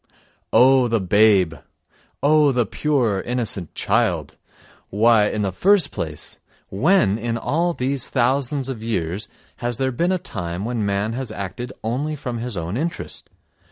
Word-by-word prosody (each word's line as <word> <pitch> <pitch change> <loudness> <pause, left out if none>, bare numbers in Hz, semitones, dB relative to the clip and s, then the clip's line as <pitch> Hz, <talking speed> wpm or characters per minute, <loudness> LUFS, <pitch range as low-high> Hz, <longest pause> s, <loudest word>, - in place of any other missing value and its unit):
Oh, 130 0 +5
the 115 -1 +1
babe! 95 -2 +4 0.7
Oh, 150 0 +5
the 120 -2 +1
pure, 120 -5 0
innocent 115 -8 -3
child! - - 0 0.5
Why, 110 0 +4
in 105 0 -2
the 95 - -1
first 190 - +3
place, 75 -3 -6 0.3
when 125 - +2
in 115 +1 -2
all 170 +8 0
these 130 0 -1
thousands 135 +2 0
of 130 -5 -5
years 100 -3 -2 0.3
has 120 -1 -3
there 130 0 0
been 170 +9 0
a 185 - +2
time 85 - -5
when 120 -2 -2
man 100 +3 -1
has 125 -2 -4
acted 110 +5 -6
only 135 +8 -2
from 125 -5 -5
his 120 -4 -4
own 85 +5 -3
interest? 170 +5 -4
120 Hz, 150 wpm, -22 LUFS, 105-135 Hz, 0.7 s, Oh